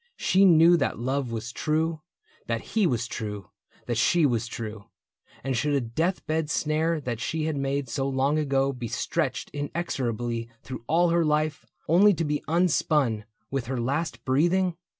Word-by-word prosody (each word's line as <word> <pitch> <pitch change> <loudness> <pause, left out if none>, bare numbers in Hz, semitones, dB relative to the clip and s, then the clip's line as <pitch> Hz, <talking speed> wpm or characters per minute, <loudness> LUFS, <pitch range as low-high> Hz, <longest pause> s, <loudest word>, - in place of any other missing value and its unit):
She 190 +2 +4
knew 170 -1 +7
that 135 - -1
love 130 +1 -2
Was 115 +1 -4
true, 160 +3 -1 0.5
that - - -3
he 215 -5 +3
was 120 -6 0
true, 105 -4 -6 0.3
that 120 -2 -1
she 165 +8 +4
was 120 -4 0
true; 110 -3 -6 0.6
And 135 0 -1
should 145 +5 +1
a - - +3
death 160 +10 -2
bed 155 -1 -1
snare 155 +1 0
that 120 -4 -4
she 155 +5 -2
had 160 -1 -1
made 140 0 -1
So 135 +4 -2
long 135 +3 +1
ago 135 -2 +1
be 125 -2 -5
stretched - - -2
inexorably 120 -6 -3
Through 125 -3 -7
all 175 +2 +3
her 170 0 +3
life, 155 0 0 0.2
only 195 +4 +5
to 165 - -1
be 150 0 -1
unspun 155 - +2 0.3
With 135 -4 -2
her 130 -1 -2
last 140 +7 -2
breathing? 175 +7 +2
140 Hz, 170 wpm, -26 LUFS, 120-160 Hz, 0.6 s, knew